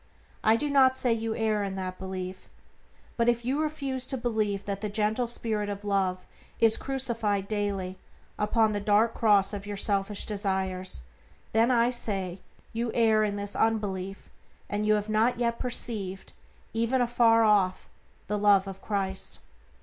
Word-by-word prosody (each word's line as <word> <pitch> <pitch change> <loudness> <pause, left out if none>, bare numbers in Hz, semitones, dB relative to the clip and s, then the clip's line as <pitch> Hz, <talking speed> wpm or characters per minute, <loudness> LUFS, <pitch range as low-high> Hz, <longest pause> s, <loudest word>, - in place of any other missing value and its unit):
I 220 - +5
do 295 +6 -1
not 265 -2 +4
say 245 -3 +3
you 225 0 -2
err 220 -2 0
in 195 -1 -3
that 185 -1 -5
belief; 185 0 -6 0.7
but 235 0 +3
if 240 0 0
you 275 +4 0
refuse 275 -4 -2
to 265 - 0
believe 215 -5 -1
that 200 -1 -3
the 210 - -2
gentle 215 +3 0
spirit 220 -3 -1
of 200 0 -5
Love 190 -2 0 0.3
is 225 -1 +5
crucified 230 -7 -1
daily 200 -3 -2 0.4
upon 215 +1 +2
the 205 - -1
dark 210 +3 +3
cross 205 -3 +3
of 205 0 -6
your 205 -1 -4
selfish 200 0 0
desires, 190 - -1 0.5
then, 225 +2 +3
I 240 -1 +3
say, 195 -6 -2 0.3
you 230 +1 -1
err 220 -2 +4
in 205 -1 -1
this 205 0 -5
unbelief, 195 -4 -1 0.4
and 210 +1 -1
have 210 -1 +2
not 220 +3 +2
yet 235 -1 0
perceived, 205 -6 -3 0.4
even 230 +3 +1
afar 235 -2 +4
off, 200 -4 +2 0.4
the 210 +1 -2
Love 200 -1 +4
of 195 0 -8
Christ. 195 -2 -3
210 Hz, 155 wpm, -28 LUFS, 195-230 Hz, 0.7 s, I